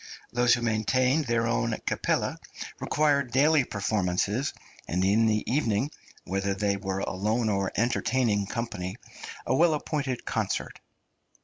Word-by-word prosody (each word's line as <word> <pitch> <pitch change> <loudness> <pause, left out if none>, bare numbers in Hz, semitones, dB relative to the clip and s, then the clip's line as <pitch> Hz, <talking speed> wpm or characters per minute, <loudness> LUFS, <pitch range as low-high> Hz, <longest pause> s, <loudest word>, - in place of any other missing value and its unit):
Those 120 0 +4
who 120 - -4
maintained 125 +7 +2
their 115 -1 +1
own 115 -1 0
Kapelle - - 0 0.4
required 145 -3 +2
daily 145 +3 +4
performances, 105 +3 0 0.4
and 90 +2 0
in 110 +4 +4
the 110 -1 +1
evening, 125 0 0 0.3
whether 95 +1 -1
they 100 0 +1
were 95 -1 -3
alone 110 +5 0
or 100 -2 0
entertaining 115 -3 +1
company, 105 -5 -4 0.5
a 120 - +1
well 160 +1 +4
appointed 140 -4 -3
concert. - - -2
115 Hz, 125 wpm, -27 LUFS, 100-130 Hz, 0.5 s, Those